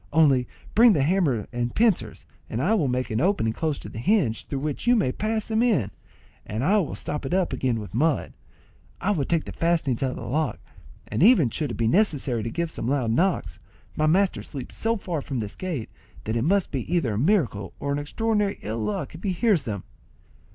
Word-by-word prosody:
Only 140 -5 +4 0.3
bring 230 0 +7
the 145 -6 +2
hammer 145 - +1
and 120 0 -2
pincers, 185 - +1 0.2
and 110 - -3
I 175 - +2
will 175 -11 +2
make 125 -1 -1
an 110 +3 0
opening 160 - +1
close 155 0 -1
to - - -8
the 110 - -7
hinge, 135 - +1
through 140 - -3
which 150 - -3
you 245 - +6
may 195 - +2
pass 220 +6 -2
them 220 0 0
in, 190 - +2 0.5
and 110 +4 -4
I 200 +8 +4
will 175 - -2
stop 150 0 -4
it 135 +7 -1
up 185 -2 +1
again 125 -3 0
with 100 -4 -8
mud. 150 +6 +1 0.7
I 195 - 0
will 155 -9 0
take 165 +1 0
the - - -6
fastenings 165 -7 0
out 135 - +1
of 130 - -5
the - - -7
lock, 155 +4 -1 0.5
and - - -2
even 180 - +6
should 150 +2 -2
it - - -4
be 115 - +1
necessary 140 - +2
to 115 - -3
give 170 +4 -2
some 115 - -4
loud 130 -4 +1
knocks, 125 - 0 0.4
my 155 - +2
master 190 +4 +2
sleeps 135 -4 -8
so 230 +1 0
far 175 -5 -3
off - - -9
from 135 - -3
this 105 -3 -4
gate, 165 -11 -4 0.3
that 110 - -2
it 115 +2 0
must 195 +3 +2
be 135 +2 -4
either 160 -11 +1
a 105 - -1
miracle 135 - +1
or 140 - -2
our 140 - 0
extraordinary 210 +6 0
ill 110 +2 -3
luck 110 +5 -3
if 160 - -10
he 195 -3 -1
hears 195 - +2
them." 100 -5 -4
150 Hz, 225 wpm, -25 LUFS, 120-190 Hz, 0.7 s, bring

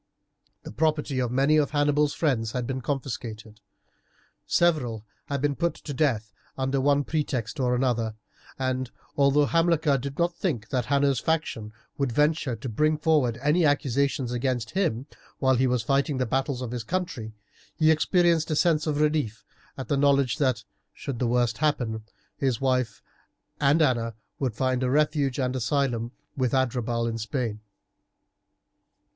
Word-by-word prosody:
The - - -8
property 150 0 0
of 125 -2 0
many 140 +4 +3
of 150 -2 +2
Hannibal's 145 0 +2
friends 115 -9 0
had 125 -1 -2
been 130 +1 -3
confiscated. 115 -5 -5 0.9
Several 125 -11 +1 0.2
had 140 -2 -2
been 145 -1 +1
put 170 +2 0
to 145 - -7
death 115 -8 0 0.2
under 135 0 0
one 145 +1 +3
pretext 145 -4 -2
or 125 -1 +2
another, 120 -4 0 0.4
and 130 -1 -1 0.3
although 140 +1 +4
Hamilcar 165 -3 +2
did 140 +2 -6
not 170 0 +1
think 125 - -2
that 125 -3 0
Hanno's 140 -2 +2
faction 150 -10 -2 0.3
would 135 -3 +1
venture 150 -1 +1
to 115 +4 -7
bring 150 +7 +1
forward 150 -7 +2
any 155 +4 +3
accusation 140 -2 +1
against 125 -2 -1
him 140 - 0 0.3
while 130 -1 +3
he 130 +1 +2
was 125 -2 0
fighting 140 +2 +1
the 130 - +1
battles 130 +1 -1
of 120 - -5
his 120 -2 -4
country, 130 - -3 0.4
he 155 -1 +4
experienced 170 0 +2
a 155 - 0
sense 160 -1 +2
of 150 -1 0
relief 150 -8 0 0.3
at 130 - -5
the 140 - +1
knowledge 140 -1 +3
that, 130 -5 +1 0.3
should 130 -4 -5
the 125 - +1
worst 120 -2 +1
happen, 120 -8 0 0.3
his 130 -5 0
wife 125 -6 0 0.6
and 145 +3 +4
Anna 115 -5 +1 0.2
would 130 -6 -1
find 130 +1 0
a 130 - +1
refuge 145 -1 +1
and 130 -1 0
asylum 120 -2 0 0.2
with 130 -2 0
Adherbal 120 -2 0
in 115 0 -3
Spain. 115 -1 -3
135 Hz, 155 wpm, -26 LUFS, 120-150 Hz, 0.9 s, although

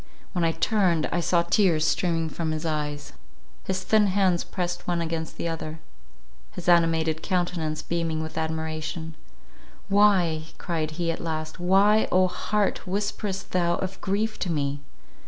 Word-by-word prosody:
When 175 -3 0
I 165 0 +2
turned, 170 -2 +2
I 175 - +1
saw 170 0 +2
tears 170 -3 +3
streaming 165 -1 +1
from 160 0 -3
his 155 +1 -4
eyes; 150 -2 -3 0.5
his 185 0 -2
thin 215 +1 +4
hands 185 -3 +2
pressed 175 -2 -4
one 175 -1 +1
against 165 -1 -3
the - - -2
other, 160 -1 -5 0.7
his 175 - -8
animated 165 -2 +3
countenance 175 -4 -1
beaming 165 -2 -1
with 160 - -7
admiration; 160 0 -3 0.8
"Why," 190 -6 +4
cried 160 -4 -2
he, 170 -1 0
at 165 - -5
last, 155 -1 -4
"Why, 195 +4 +4
oh 185 0 +5
heart, 205 +1 -1
whisperest 200 0 -3
thou 175 -1 +2
of 190 0 -5
grief 210 +3 -1
to 180 - -1
me? 145 -2 -1
170 Hz, 150 wpm, -26 LUFS, 160-185 Hz, 0.8 s, oh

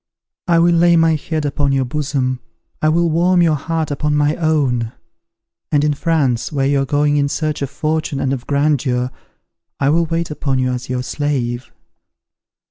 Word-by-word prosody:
I 170 -1 +4
will 170 +1 +4
lay 170 0 +4
my 165 -1 +4
head 155 0 -2
upon 140 -1 0
your 135 -1 +1
bosom: 130 -2 -2 0.4
I 155 - +3
will 170 +2 +2
warm 175 +2 +3
your 165 -2 +3
heart 160 +1 -2
upon 150 +1 0
my 150 +1 +2
own; 135 -8 0 0.8
and 145 -2 +3
in 150 0 +2
France, 140 -6 0
where 140 -3 0
you 140 0 +2
are - - 0
going 145 +1 +1
in 140 0 +1
search 155 0 -2
of 140 - -2
fortune 155 -1 -2
and 135 0 0
of 125 -2 -6
grandeur, 140 -3 +1 0.7
I 135 - +2
will 165 +3 +3
wait 165 0 -2
upon 140 -3 -1
you 130 0 0
as 125 0 -5
your 125 0 -2
slave. 125 -4 -2
145 Hz, 180 wpm, -18 LUFS, 135-160 Hz, 0.8 s, I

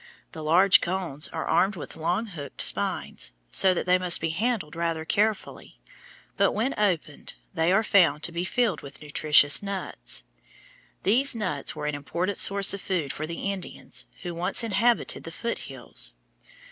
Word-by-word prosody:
The 160 - -8
large 180 +5 +5
cones 170 -5 -2
are 160 - -5
armed 195 +2 +2
with 165 - -8
long 175 +7 -1
hooked 150 - -9
spines, - - -1 0.2
so 190 - +5
that - - -2
they 180 0 +3
must 180 -1 +4
be 165 0 -1
handled 200 -4 -1
rather 165 -1 -2
carefully, 210 +4 -1 0.6
but - - +3
when 235 +6 0
opened 175 -8 -2 0.2
they 165 0 +1
are 205 +4 +3
found 165 -8 +3
to - - 0
be 170 +1 -2
filled 210 -2 0
with 140 +2 -11
nutritious 150 -1 +4
nuts. 200 -2 -3 0.8
These 255 +6 +3
nuts 185 -11 -2
were 150 - -5
an 150 - -1
important 170 +7 -3
source 200 0 +5
of 200 - -5
food 170 -7 -2
for 155 - -5
the 170 +4 -3
Indians 190 -2 -5 0.2
who 175 -2 -4
once 180 +7 +2
inhabited 230 +2 +1
the 165 - -8
foot 235 +7 -4
hills. - - -5
180 Hz, 165 wpm, -26 LUFS, 160-200 Hz, 0.8 s, large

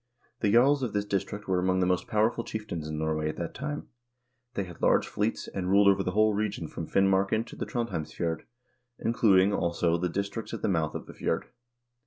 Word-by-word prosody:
The 105 - +2
jarls 135 +5 +5
of 125 -5 -2
this 105 0 0
district 100 +1 -3
were 95 -1 +2
among 95 +1 +1
the 90 - +3
most 90 -1 0
powerful 110 +2 +1
chieftains 100 -9 -5
in 75 0 -4
Norway 80 0 -1
at - - -4
that 85 - -4
time; 150 +2 -5 0.7
they 100 - 0
had 90 -2 -11
large - - +3
fleets, 105 +2 -2
and 90 -2 -3
ruled 100 +1 +5
over 100 0 +5
the 90 -1 -2
whole 110 +1 +4
region 100 -5 -2
from 80 +1 -6
Finmarken 95 +3 +2
to - - -11
the - - -4
Trondhjemsf 95 -11 -3
jord, 85 -2 -2 0.5
including, 105 -5 +3
also, 85 -2 +1
the 90 +1 0
district 100 +5 -3
at - - -9
the - - +2
mouth 80 -5 0
of - - -5
the - - -11
fjord. - - -2
95 Hz, 210 wpm, -28 LUFS, 85-110 Hz, 0.7 s, jarls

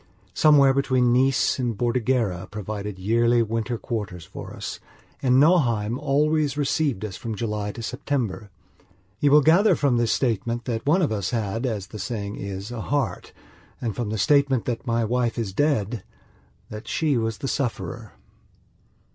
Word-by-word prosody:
Somewhere 140 -3 +5
between 130 -3 +2
Nice 130 +1 +2
and 120 -4 -1
Bordighera 120 -6 0
provided 105 -1 -5
yearly 115 +4 +2
winter 115 +2 -2
quarters 105 - -5
for - - -9
us, - - -6 0.4
and 130 0 +4
Nauheim 120 -8 +3
always 150 0 +1
received 140 -6 0
us 95 -3 -6
from 115 -2 -5
July 105 -2 -3
to 115 - -7
September. 110 -5 -3 0.7
You 145 - +3
will 150 +1 +6
gather 175 +8 +5
from 135 -4 +2
this 120 -1 +1
statement 120 -1 -1
that 115 0 -3
one 175 +5 +4
of 150 - +1
us 100 -4 -1
had, 115 +1 -2
as 105 -5 -3
the 105 +2 -10
saying 100 0 -4
is, 100 +2 -6
a 120 -2 -5
"heart", 135 -7 -2 0.5
and, 115 -4 -3
from 120 -4 -3
the 110 - -2
statement 135 +3 +3
that 125 +2 -3
my 115 -1 +1
wife 120 +1 0
is 110 -5 -3
dead, 115 -5 0 0.7
that 105 +1 -8
she 155 -3 +1
was 115 -2 -1
the 135 - -4
sufferer. 120 -4 -3
120 Hz, 160 wpm, -24 LUFS, 105-135 Hz, 0.7 s, will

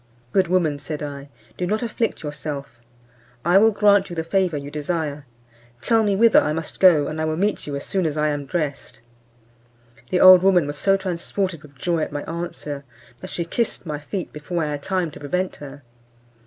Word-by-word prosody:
"Good 190 -2 +3
woman," 165 -5 +1
said 150 +1 -5
I, 140 -1 -7 0.3
"do 180 - -1
not 215 +5 -1
afflict 230 -4 -2
yourself, 145 -4 -6 0.7
I 175 +3 +6
will 220 +2 +6
grant 205 -2 +3
you 175 - -6
the 160 - -2
favour 180 -2 0
you 140 0 -7
desire; 150 -2 -3 0.5
tell 225 - +2
me 205 -2 +1
whither 230 +2 +6
I 150 - -1
must 160 0 -5
go, 170 -6 +6
and 155 +2 -4
I - - 0
will 155 0 -1
meet 205 -1 -1
you 145 - -3
as 140 - -5
soon 190 -4 0
as 155 -1 -3
I 150 0 +2
am 145 -1 -3
dressed." 145 -6 -4 1.1
The 180 - +1
old 185 -1 +9
woman 185 -4 +4
was 145 0 -5
so 195 0 +3
transported 185 -1 -3
with 145 -2 -16
joy 170 +5 0
at 155 - -2
my 145 - -4
answer, 165 -4 -5 0.4
that 185 - -8
she 170 - -3
kissed 225 +3 -2
my 150 -2 -4
feet 175 +5 -5
before 165 +3 -3
I 150 - -2
had 145 -1 -4
time 185 -1 -1
to - - -11
prevent 180 +6 -2
her. 145 -1 -10
165 Hz, 205 wpm, -22 LUFS, 145-185 Hz, 1.1 s, old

